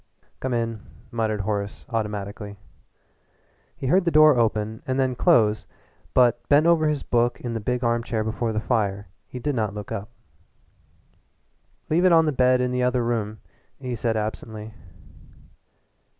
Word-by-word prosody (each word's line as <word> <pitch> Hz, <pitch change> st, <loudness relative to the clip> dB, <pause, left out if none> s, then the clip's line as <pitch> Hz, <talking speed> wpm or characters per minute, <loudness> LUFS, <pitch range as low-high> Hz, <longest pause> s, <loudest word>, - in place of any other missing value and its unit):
"Come 130 Hz, -, -3 dB
in," 115 Hz, -2 st, -2 dB, 0.3 s
muttered 110 Hz, -3 st, -1 dB
Horace 100 Hz, 0 st, -3 dB
automatically. 105 Hz, -2 st, -4 dB, 1.2 s
He -, -, -6 dB
heard 180 Hz, +8 st, +3 dB
the 175 Hz, -, +2 dB
door 155 Hz, -2 st, +6 dB
open 110 Hz, -2 st, 0 dB
and 130 Hz, +1 st, 0 dB
then 130 Hz, -1 st, +1 dB
close, 110 Hz, -3 st, +3 dB, 0.5 s
but, 125 Hz, -2 st, +4 dB
bent 145 Hz, +2 st, +5 dB
over 165 Hz, -2 st, +4 dB
his 150 Hz, -2 st, -1 dB
book 120 Hz, 0 st, +1 dB
in 120 Hz, -2 st, -4 dB
the 115 Hz, -, -2 dB
big 125 Hz, +4 st, -2 dB
armchair 115 Hz, -1 st, 0 dB
before 115 Hz, +1 st, -2 dB
the 110 Hz, -, -1 dB
fire, 105 Hz, -5 st, -1 dB, 0.2 s
he -, -, -9 dB
did 145 Hz, +4 st, -2 dB
not 105 Hz, -5 st, -1 dB
look 105 Hz, -1 st, -7 dB
up. 100 Hz, +3 st, -4 dB, 1.8 s
"Leave 170 Hz, +3 st, +3 dB
it 185 Hz, -, +5 dB
on 165 Hz, -1 st, +6 dB
the 155 Hz, -, +1 dB
bed 125 Hz, -1 st, +3 dB
in 125 Hz, 0 st, 0 dB
the 125 Hz, 0 st, 0 dB
other 125 Hz, -1 st, +1 dB
room," 110 Hz, -3 st, -2 dB, 0.4 s
he 130 Hz, -2 st, -4 dB
said 115 Hz, -1 st, -1 dB
absently. 110 Hz, 0 st, -5 dB
115 Hz, 155 wpm, -24 LUFS, 110-130 Hz, 1.8 s, door